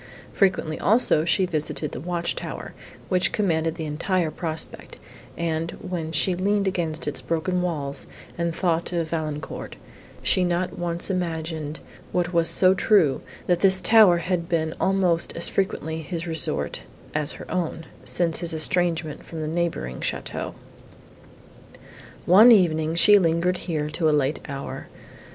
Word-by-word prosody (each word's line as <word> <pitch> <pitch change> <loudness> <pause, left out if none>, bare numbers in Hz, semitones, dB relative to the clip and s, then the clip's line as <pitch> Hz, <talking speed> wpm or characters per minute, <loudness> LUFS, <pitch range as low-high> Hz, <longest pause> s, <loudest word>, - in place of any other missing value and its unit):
Frequently, 185 -5 +1
also, 200 -7 +3
she 185 +2 +2
visited 155 -3 -3
the - - -6
watch 170 +2 -2
tower, - - -7 0.3
which 185 -1 +1
commanded 165 -5 0
the 160 - -5
entire 165 +2 -1
prospect, 160 0 -6 0.4
and, 165 -1 -2
when 175 -4 -5
she 165 +4 +2
leaned 200 +2 0
against 165 -4 -2
its - - -3
broken 170 +2 -1
walls, 145 -6 -3 0.3
and 170 -1 -2
thought 170 -2 0
of 165 -2 -1
Valancourt, 155 -2 -4 0.5
she 185 - +3
not 175 +1 -1
once 175 +1 -2
imagined, 160 -4 -3 0.3
what 180 0 -1
was 170 -1 +3
so 185 0 +5
true, 185 -7 +3 0.2
that 175 -1 +2
this 190 -1 +5
tower 205 -2 +6
had 170 -1 -2
been 160 -2 0
almost 185 -3 +1
as 170 - +6
frequently 160 -5 -2
his 165 +1 -5
resort, 165 -2 +1 0.3
as 150 -1 -1
her - - -10
own, 165 -2 -3 0.2
since 170 -2 +2
his 170 -2 -2
estrangement 165 -2 0
from 165 - -8
the 155 - -3
neighbouring 160 - -2
château. - - -4 1.7
One 210 +7 +8
evening, 160 -6 +3
she 205 +4 +6
lingered 170 +1 +1
here 150 -3 -1
to 160 0 +1
a 150 -1 +3
late 140 +2 -1
hour. 140 -1 -6
170 Hz, 145 wpm, -24 LUFS, 160-180 Hz, 1.7 s, One